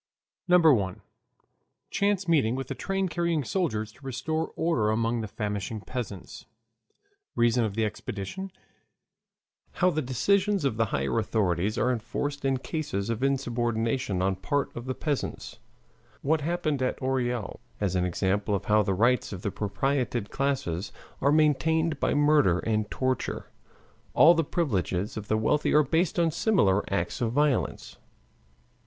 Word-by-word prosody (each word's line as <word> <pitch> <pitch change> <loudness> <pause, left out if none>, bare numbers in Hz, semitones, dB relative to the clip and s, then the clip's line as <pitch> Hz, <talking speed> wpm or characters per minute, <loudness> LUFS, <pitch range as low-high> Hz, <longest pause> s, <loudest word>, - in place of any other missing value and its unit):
1. 130 - +4 0.9
Chance 200 -2 +1
Meeting 140 -8 +3
with 135 -1 -5
a - - +1
Train 195 -1 -1
Carrying 170 -3 0
Soldiers 110 - -1
to 135 - -22
Restore 135 +5 -2
Order 125 -11 +1
Among 115 +2 0
the 110 - -4
Famishing 105 +1 -4
Peasants 105 -6 -7 0.9
Reason 120 0 +3
of 105 -3 -2
the 110 -1 +1
Expedition 105 - -5 1.2
How 180 0 +2
the 155 - -1
Decisions 190 - +1
of 115 -6 0
the 115 - +3
Higher 70 - -1
Authorities 100 +1 0
are 125 +3 +2
Enforced 140 +5 -3
in 135 -1 +1
Cases 130 - -3
of 115 +1 -3
Insubordination 120 -5 0
on 95 0 +1
Part 145 +9 -2
of 120 - -6
the 130 0 -3
Peasants 145 -3 -3 0.6
What 155 +2 +2
Happened 155 -3 -1
at 130 - -1
Orel, 125 -4 -2 0.2
as 95 -3 0
an 90 - +2
Example 100 +3 0
of 100 - -4
How 105 0 +4
the 95 -2 0
Rights 120 +5 +2
of 95 -2 -7
the 100 - -1
Propertied 120 +2 -1
Classes 130 - -1 0.3
are 140 - +3
Maintained 155 +1 +2
by - - +1
Murder 145 - +4
and 110 +1 -1
Torture 130 -1 -2 0.6
All 165 +3 +8
the 165 -1 +1
Privileges 105 - -1
of 110 -1 -6
the 110 - +1
Wealthy 110 +9 +1
are 150 - +6
Based 165 +4 0
on 170 -2 +3
Similar 105 - +2
Acts 90 +1 -1
of 115 -1 0
Violence. 145 -2 0
125 Hz, 150 wpm, -27 LUFS, 105-150 Hz, 1.2 s, All